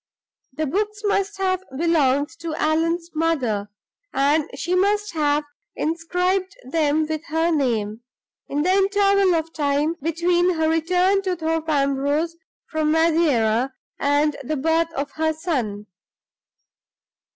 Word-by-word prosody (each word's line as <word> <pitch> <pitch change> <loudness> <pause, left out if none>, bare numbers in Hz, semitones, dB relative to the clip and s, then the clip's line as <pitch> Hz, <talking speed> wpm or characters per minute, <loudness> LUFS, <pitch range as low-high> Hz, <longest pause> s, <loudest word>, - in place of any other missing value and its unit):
The 310 +3 -2
books 420 +7 -2
must 400 0 0
have 375 -1 0
belonged 295 -3 +2
to 330 -2 -4
Allan's 330 +3 0
mother; 260 -11 0 0.4
and 285 +3 +2
she 345 +6 -2
must 410 +2 +1
have 300 -1 +1 0.3
inscribed 360 +4 -1
them 305 +3 +1
with 310 +1 -4
her 325 +2 0
name, 230 -7 0 0.5
in 290 +1 -1
the 365 - +2
interval 395 -1 +3
of 325 0 -2
time 290 +1 +1
between 345 +3 +1
her 320 0 +1
return 360 +5 +2
to 375 -2 -1
Thorpe 325 -1 -2
Ambrose 285 +3 +1 0.3
from 310 -1 -1
Madeira 275 -7 +2 0.3
and 290 +1 +2
the 305 +4 -2
birth 325 +3 +1
of 280 +1 -3
her 315 0 +1
son. 250 - -3
320 Hz, 125 wpm, -22 LUFS, 290-350 Hz, 0.5 s, interval